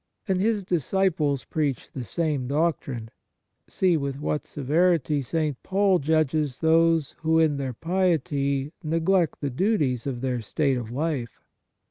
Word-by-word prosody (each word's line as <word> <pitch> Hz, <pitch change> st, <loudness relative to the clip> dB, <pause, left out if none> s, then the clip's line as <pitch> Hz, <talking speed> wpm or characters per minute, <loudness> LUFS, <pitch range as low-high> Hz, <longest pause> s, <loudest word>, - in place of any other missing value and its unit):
And 190 Hz, -2 st, +1 dB
His 215 Hz, -1 st, +1 dB
disciples 165 Hz, -4 st, 0 dB
preach 145 Hz, -6 st, -2 dB
the 130 Hz, -, -5 dB
same 150 Hz, -1 st, -1 dB
doctrine. 140 Hz, -6 st, -1 dB, 0.6 s
See 180 Hz, -3 st, +2 dB
with 140 Hz, -2 st, -3 dB
what 150 Hz, 0 st, -2 dB
severity 150 Hz, 0 st, +1 dB
St. 150 Hz, 0 st, -2 dB
Paul 195 Hz, -1 st, +2 dB
judges 155 Hz, -2 st, +1 dB
those 165 Hz, -2 st, +3 dB
who, 160 Hz, 0 st, +2 dB
in 155 Hz, -3 st, +3 dB
their 135 Hz, -2 st, -3 dB
piety, 145 Hz, -4 st, 0 dB
neglect 165 Hz, +2 st, +1 dB
the 140 Hz, -2 st, -2 dB
duties 140 Hz, -, 0 dB
of 125 Hz, -3 st, -3 dB
their 125 Hz, -2 st, -1 dB
state 135 Hz, +4 st, 0 dB
of 115 Hz, -3 st, -5 dB
life. 135 Hz, -2 st, -3 dB
155 Hz, 135 wpm, -25 LUFS, 135-165 Hz, 0.6 s, those